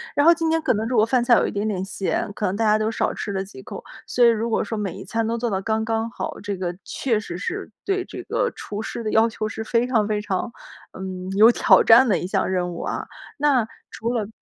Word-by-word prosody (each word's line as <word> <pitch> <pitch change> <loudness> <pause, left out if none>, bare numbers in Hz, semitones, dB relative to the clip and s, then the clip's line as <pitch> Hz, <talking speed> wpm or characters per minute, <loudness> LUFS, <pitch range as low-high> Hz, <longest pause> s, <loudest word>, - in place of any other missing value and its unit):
然 290 +2 +4
后 340 - +9
今 330 -1 -1
天 325 0 +2
可 310 - +2
能 220 0 -1
如 245 0 0
果 215 - +5
饭 245 +1 +2
菜 240 0 +5
有 - - +2
一 - - -3
点 205 +1 -2
点 190 -3 -2
咸， 195 +1 -2
可 210 - -2
能 185 - 0
大 225 - +1
家 215 0 +4
都 215 +1 0
少 - - -1
吃 205 - -4
了 190 -1 -2
几 205 - -12
口。 - - -8 0.2
所 245 - +3
以 - - +8
如 230 0 +2
果 225 - +1
说 225 - -4
每 200 -4 -3
一 195 - -9
餐 225 +4 -1
都 230 +1 -1
做 235 0 -1
得 190 -2 -1
刚 220 +2 -1
刚 225 0 -1
好， - - -5
这 205 -1 -3
个 175 -1 -3
确 240 -5 -1
实 175 -5 -6
是， 370 - -4
对 385 -1 0
这 - - -8
个 - - -1
厨 210 0 -6
师 230 - -5
的 215 - -2
要 225 +1 +4
求 215 -1 -3
是 220 +1 -5
非 230 +2 +1
常 225 -5 +2
非 210 -1 0
常， 205 +2 -2 0.4
嗯， 185 -1 -6
有 220 +2 +8
挑 - - +5
战 240 +3 +7
的 195 - +3
一 175 - -4
项 185 - 0
任 180 -1 -1
务 170 - -6
啊。 - - -4 0.3
那， 275 -5 +3 0.3
除 230 +2 -3
了 220 -4 -1
220 Hz, 290 characters per minute, -23 LUFS, 200-235 Hz, 0.4 s, 后